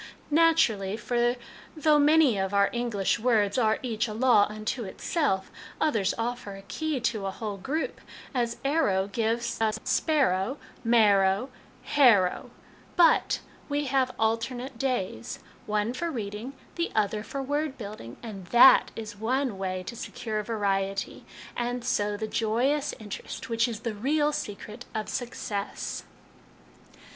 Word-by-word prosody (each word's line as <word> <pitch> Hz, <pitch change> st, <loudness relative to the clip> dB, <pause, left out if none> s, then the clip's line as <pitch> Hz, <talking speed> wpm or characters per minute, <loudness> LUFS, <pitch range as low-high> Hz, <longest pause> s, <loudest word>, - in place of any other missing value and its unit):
" -, -, -28 dB
Naturally; 270 Hz, -12 st, +3 dB
for 240 Hz, +1 st, +1 dB, 0.4 s
though 305 Hz, -1 st, +4 dB
many 295 Hz, -4 st, +5 dB
of 195 Hz, 0 st, -1 dB
our 200 Hz, 0 st, +4 dB
English 235 Hz, -4 st, 0 dB
words 215 Hz, -4 st, +2 dB
are 220 Hz, -2 st, +3 dB
each 230 Hz, -2 st, -1 dB
a 215 Hz, -, -5 dB
law 235 Hz, -3 st, +5 dB
unto 215 Hz, +3 st, -3 dB
itself, 195 Hz, -, -1 dB, 0.3 s
others 220 Hz, -11 st, +1 dB
offer 230 Hz, -3 st, -3 dB
a 195 Hz, -, -11 dB
key 310 Hz, +7 st, -2 dB
to 220 Hz, -4 st, -1 dB
a -, -, 0 dB
whole 205 Hz, 0 st, -5 dB
group, 285 Hz, +11 st, -3 dB, 0.3 s
as 235 Hz, -2 st, -1 dB
arrow 240 Hz, -11 st, +2 dB
gives 230 Hz, +3 st, -1 dB
us 220 Hz, -1 st, +2 dB
sp -, -, 0 dB
arrow, 260 Hz, -5 st, +2 dB, 0.3 s
m 235 Hz, 0 st, +3 dB
arrow, 200 Hz, +1 st, +4 dB, 0.4 s
h 290 Hz, -, -3 dB
arrow; 205 Hz, -9 st, +5 dB, 0.5 s
but 340 Hz, -2 st, +4 dB, 0.3 s
we 290 Hz, 0 st, 0 dB
have 265 Hz, -1 st, +2 dB
alternate 235 Hz, +3 st, -1 dB
days 195 Hz, -, -2 dB, 0.3 s
one 210 Hz, +2 st, 0 dB
for 340 Hz, +6 st, -2 dB
reading, 220 Hz, -1 st, -5 dB, 0.2 s
the 340 Hz, -, -1 dB
other 210 Hz, 0 st, +1 dB
for 270 Hz, +5 st, -5 dB
word 290 Hz, +1 st, -2 dB
building 200 Hz, -, -8 dB
and 195 Hz, -6 st, -8 dB
that 240 Hz, +6 st, +7 dB
is 215 Hz, -2 st, -6 dB
one 245 Hz, +3 st, -1 dB
way 185 Hz, -1 st, -2 dB
to 235 Hz, -, -7 dB
secure 220 Hz, -1 st, -4 dB
variety, 195 Hz, -3 st, -2 dB, 0.3 s
and, 245 Hz, 0 st, -2 dB
so, 210 Hz, -4 st, 0 dB
the 220 Hz, -, -3 dB
joyous 245 Hz, +8 st, 0 dB
interest 220 Hz, +4 st, -7 dB
which 230 Hz, +1 st, +2 dB
is 225 Hz, -2 st, -5 dB
the 230 Hz, -1 st, -3 dB
real 295 Hz, +8 st, +1 dB
secret 215 Hz, -1 st, -6 dB
of 215 Hz, -1 st, -2 dB
success." 230 Hz, -5 st, -4 dB
230 Hz, 145 wpm, -27 LUFS, 205-260 Hz, 0.5 s, that